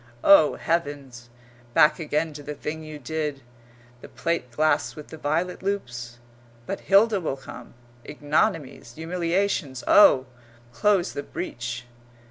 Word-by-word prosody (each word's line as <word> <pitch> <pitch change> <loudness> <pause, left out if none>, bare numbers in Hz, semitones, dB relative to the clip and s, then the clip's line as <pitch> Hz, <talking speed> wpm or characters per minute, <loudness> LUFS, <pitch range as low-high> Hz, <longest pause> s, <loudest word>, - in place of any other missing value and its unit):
Oh, 180 -7 +7
heavens! 140 -7 -3 0.5
Back 150 - +5
again 155 0 -1
to 145 - -9
the 150 +1 -7
thing 160 +2 -5
you 155 -1 -8
did, 150 0 -4 0.6
the - - -10
plate 165 -7 -2
glass 150 +4 +1
with 150 - -10
the 160 - -9
violet 160 +5 -2
loops? 120 -12 -4 0.5
But 195 - -4
Hilda 200 0 +3
will 145 -5 -3
come. 135 - -11 0.3
Ignominies, 145 - -1
humiliations, 170 -4 -1
oh! 130 -10 +6 0.5
Close 200 - +2
the 140 - -4
breach. 120 -7 -6
155 Hz, 125 wpm, -25 LUFS, 135-175 Hz, 0.6 s, Oh